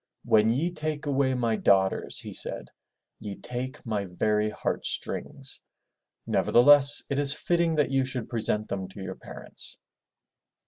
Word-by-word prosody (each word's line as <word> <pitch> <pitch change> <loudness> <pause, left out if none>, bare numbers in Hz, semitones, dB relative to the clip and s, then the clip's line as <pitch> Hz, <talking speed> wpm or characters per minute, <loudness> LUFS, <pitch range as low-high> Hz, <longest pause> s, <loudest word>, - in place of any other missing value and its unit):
"When 110 0 +4
ye 155 +9 0
take 155 -2 -4
away 135 -2 +1
my 115 -3 0
daughters/' 95 -2 +1
he - - -8
said, - - -6 0.5
''y^ 100 -2 -7
take 125 +3 -6
my 105 -3 -2
very 105 +4 0
heart 105 - -3
strings. - - -3 0.6
Nevertheless 145 +3 +6
it 140 - 0
is 145 0 +3
fitting 170 0 0
that 150 -2 +1
you 135 -1 +2
should 130 -3 -5
present 110 -2 -1
them 95 -1 -4
to 95 - -13
your 95 - -5
parents.' - - -7
125 Hz, 145 wpm, -26 LUFS, 105-145 Hz, 0.6 s, Nevertheless